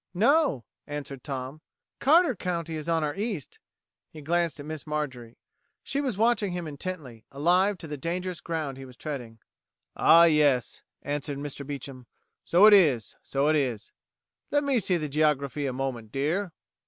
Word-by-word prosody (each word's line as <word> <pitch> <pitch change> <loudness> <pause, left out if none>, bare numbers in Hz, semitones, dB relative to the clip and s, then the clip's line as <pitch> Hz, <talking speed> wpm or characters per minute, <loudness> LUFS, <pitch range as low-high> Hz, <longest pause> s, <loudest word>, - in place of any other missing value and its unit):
"No," 235 - +3 0.2
answered 140 -3 -6
Tom, 135 +1 -5 0.4
"Carter 315 -1 +4
County 170 -3 -3
is 155 +1 -5
on 165 -1 +2
our 150 -1 -1
east." 200 - -4 0.5
He 155 - -12
glanced 170 0 0
at 145 - -7
Miss 155 -1 -7
Marjorie. 130 -6 -4 0.5
She 280 - -2
was 260 -9 -2
watching 220 -4 +2
him 175 -1 -4
intently, 145 -7 -6
alive 180 +8 +2
to 165 - -9
the 150 -1 -5
dangerous 175 +2 -3
ground 155 -5 -3
he 135 - -8
was 125 -2 -14
treading. 125 -7 -6 0.6
"Ah, 170 +1 +7
yes," 150 -7 +3 0.2
answered 145 0 -3
Mr. 145 0 -5
Beecham, 135 -3 -7 0.4
"so 180 +5 +5
it 215 - +9
is 140 - +4
so 140 +1 0
it 155 - +4
is. 125 -7 -1 0.6
Let 290 0 +2
me 275 -3 +2
see 185 -3 +1
the 155 -2 -3
geography 145 -1 0
a - - -1
moment, 125 -4 -4
dear." 165 +8 -1
150 Hz, 165 wpm, -27 LUFS, 135-180 Hz, 0.6 s, it